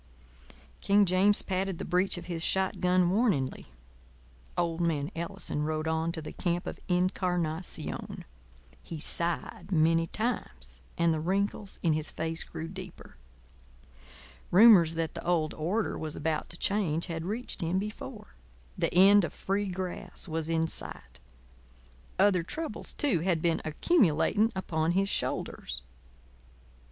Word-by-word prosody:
King 200 0 +4
James 190 +3 +4
patted 190 -1 -1
the - - -5
breech 180 +2 +1
of 175 - -7
his 165 -2 -3
shot 190 +1 +1
gun 180 -1 +3
warningly. 190 - 0 0.9
Old 170 -1 0
man 150 -4 0
Ellison 165 -3 -3
rode 155 +1 -1
on 160 +1 0
to 160 - -5
the - - -7
camp 175 -1 -1
of - - -6
Incarnación. 180 -2 -1 0.6
He 165 - -7
sighed 170 +3 -1
many 165 0 +3
times, 230 +7 -4 0.2
and 170 -1 +3
the 155 - -1
wrinkles 195 +4 -2
in 165 -3 +3
his 155 0 -1
face 160 +1 -3
grew 160 - -7
deeper. 185 0 -10 1.3
Rumours 185 -5 +7
that 165 -1 -2
the - - -7
old 170 -3 +1
order 190 +8 -1
was 155 -1 -2
about 155 0 -2
to 170 - -7
change 175 -6 +1
had 165 -2 -4
reached 215 +6 -3
him 170 +2 0
before. 195 - -6 0.4
The - - 0
end 200 +2 +7
of - - -3
Free 200 +1 -1
Grass 185 0 -5
was 160 -1 -3
in 165 0 +1
sight. - - -5 1.0
Other 190 -2 +4
troubles, 310 - -5
too, 275 - +1
had 170 0 +1
been 165 0 +1
accumulating 205 - +2
upon 165 -3 0
his 195 +2 +1
shoulders. 60 - -3
175 Hz, 140 wpm, -29 LUFS, 160-195 Hz, 1.3 s, Rumours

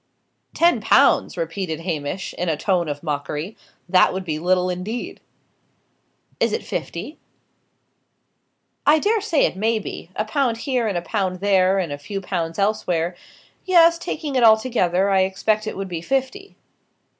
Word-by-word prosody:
"Ten 345 +1 +3
pounds!" - - +3
repeated 190 - -3
Hamish, 165 +1 -4
in 180 0 -2
a 155 - 0
tone 175 -2 0
of 145 +1 -5
mockery. 150 +5 -4 0.3
"That 185 0 +4
would 190 0 -4
be 155 -3 -3
little 180 +2 +2
indeed." 185 +7 -5 1.2
"Is - - +1
it 450 - -2
fifty?" - - -5 1.6
"I 300 +2 +5
dare 425 +6 +1
say 360 -8 +2
it - - -2
may 220 +4 +1
be. 200 -5 -7
A 215 - -1
pound 240 0 0
here 245 -1 -1
and 200 -4 -1
a 170 - -3
pound 185 -1 -2
there, 190 -1 +3
and 175 -6 -1
a 145 - -5
few 195 +7 -5
pounds 170 -4 -3
elsewhere 180 -5 0 0.5
yes, 335 -2 +5
taking 300 -3 -4
it 255 - +3
altogether, 220 -5 +3
I 190 - +4
expect 210 +3 0
it - - -4
would 195 0 -4
be 170 -3 -5
fifty." 270 - -3
195 Hz, 155 wpm, -22 LUFS, 175-235 Hz, 1.6 s, I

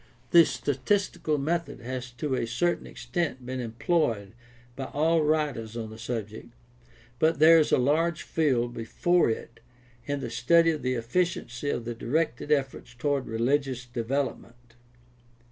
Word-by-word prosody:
The 170 -1 +8
statistical 150 - -1
method 165 +4 -2
has 130 +1 -5
to 130 +3 -3
a 120 -2 -1
certain 170 +9 0
extent 160 -7 -3
been 130 +1 -4
employed 115 - -1 0.4
by 135 - -4
all 160 +4 +2
writers 145 -8 0
on 110 -2 -5
the 110 - -11
subject, 115 0 -6 0.6
but 160 +1 +3
there 160 +2 +7
is 155 - +1
a - - +5
large 155 +6 +1
field 125 -7 0
before 170 +9 +1
it 115 +1 -5 0.5
in 145 -1 -1
the 120 -4 -5
study 165 +8 +4
of 155 -2 -4
the 130 0 0
efficiency 125 +1 -1
of 120 - -2
the 120 - -3
directed 145 +3 -1
efforts 135 -4 -1
toward 140 +1 -1
religious 125 +2 0
develop 125 +3 -2
ment. 120 0 -21
130 Hz, 145 wpm, -27 LUFS, 120-155 Hz, 0.6 s, The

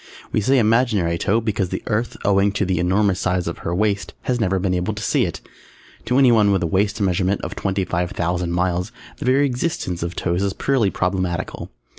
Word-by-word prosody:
We 110 - +1
say 135 +6 +3
imaginary 110 -7 +2
toe 110 +4 +1
because 105 -5 -1
the - - -4
Earth, 115 +1 -1
owing 100 0 +3
to 100 - 0
the 90 -2 0
enormous 95 +1 +2
size 90 -1 0
of 85 - -4
her 85 - -3
waist, 100 0 -1
has 125 -1 -1
never 95 -4 +1
been 95 0 0
able 90 +4 -1
to 110 - -5
see - - +2
it. - - -5 0.6
To 125 - +1
anyone 115 -6 +5
with 95 -2 +1
a - - +2
waist 100 +5 0
measurement 95 0 +1
of - - -5
twenty 95 -1 -1
five 90 -1 -1
thousand 85 0 -2
miles 90 +3 -1 0.3
the - - -6
very 135 +3 +4
existence 125 - -2
of 85 +1 -3
toes 90 +1 -1
is 100 -1 0
purely 130 -7 +1
problematical. 90 -2 -2
95 Hz, 205 wpm, -21 LUFS, 90-110 Hz, 0.6 s, anyone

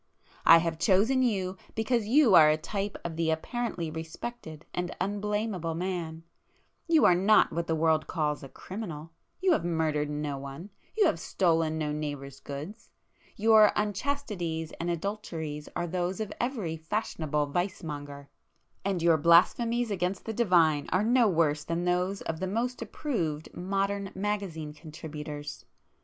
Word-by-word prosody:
I 165 - +10
have 165 -1 -1
chosen 220 +8 +3
you 195 -6 0 0.2
because 220 -1 0
you 255 -2 +5
are 155 -3 +9
a 155 - +3
type 200 +5 -4
of 165 -2 -4
the 165 -1 +1
apparently 170 0 -2
respected 160 +1 -7
and 180 0 -3
unblamable 205 -3 -2
man;—you 175 - -2
are - - +7
not 195 +5 +4
what 170 0 -2
the 160 - +1
world 160 -1 +2
calls 150 -2 -1
a 135 - -9
criminal,—you 180 - -5
have 320 - +2
murdered 160 -3 0
no 145 -2 -3
one,—you 175 - -3
have 165 - +2
stolen 165 -3 +1
no 150 -1 -1
neighbour's 145 -3 -5
goods—, 150 +11 -8 0.5
your 215 0 +6
unchastities 205 - -2
and 170 - -2
adulteries 165 -5 -4
are 175 - -1
those 180 +3 -2
of 215 -2 -3
every 220 -11 -2
'fashionable' 160 -4 -1
vice 185 +4 -2
monger,—and 145 +5 -7
your 165 -2 +5
blasphemies 225 +9 +4
against 185 0 -2
the 225 - -3
Divine 170 -10 +3
are 185 - +2
no 240 +1 +4
worse 155 -4 +2
than 170 +1 -2
those 180 +2 0
of 160 -1 -4
the 190 - -2
most 235 +6 -2
approved 185 - -3
modern 195 +2 -1
magazine 190 -7 -3
contributors. 150 -2 -8
175 Hz, 140 wpm, -29 LUFS, 160-210 Hz, 0.5 s, I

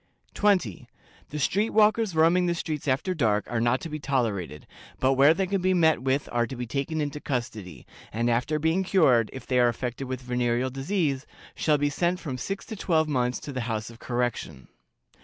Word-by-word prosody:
"20. 185 - +1 0.4
The 150 - -5
street 200 +9 +1
walkers 215 -3 +3
roaming 170 +3 +4
the 170 - 0
streets 155 -3 -4
after 135 +8 0
dark 110 - +1
are 115 -1 -1
not 120 +2 +2
to - - -5
be 155 0 -5
tolerated, 110 - -2 0.3
but 130 +1 +3
where 140 +3 +6
they 190 - 0
can 195 0 -1
be 185 0 +2
met 160 -6 +3
with 135 +2 0
are 120 -1 +1
to 130 - -7
be 125 0 -4
taken 140 +7 -3
into 150 0 -3
custody, 110 - -5 0.3
and 115 +2 -1
after 125 +6 +1
being 160 +5 +1
cured, 135 - +3
if 130 -2 -9
they 125 -1 +1
are 120 - +5
affected 125 +2 -4
with 130 -1 -4
venereal 125 0 -1
disease, 140 0 -1 0.3
shall 150 -2 +2
be 145 0 0
sent 175 +4 0
from 135 -8 -5
six 195 +9 -4
to 220 - -7
twelve 160 -5 +1
months 125 -4 0
to 145 -2 -7
the 130 - -3
House 110 +1 -3
of 115 - -15
Correction. 120 - -3
135 Hz, 200 wpm, -26 LUFS, 120-165 Hz, 0.4 s, where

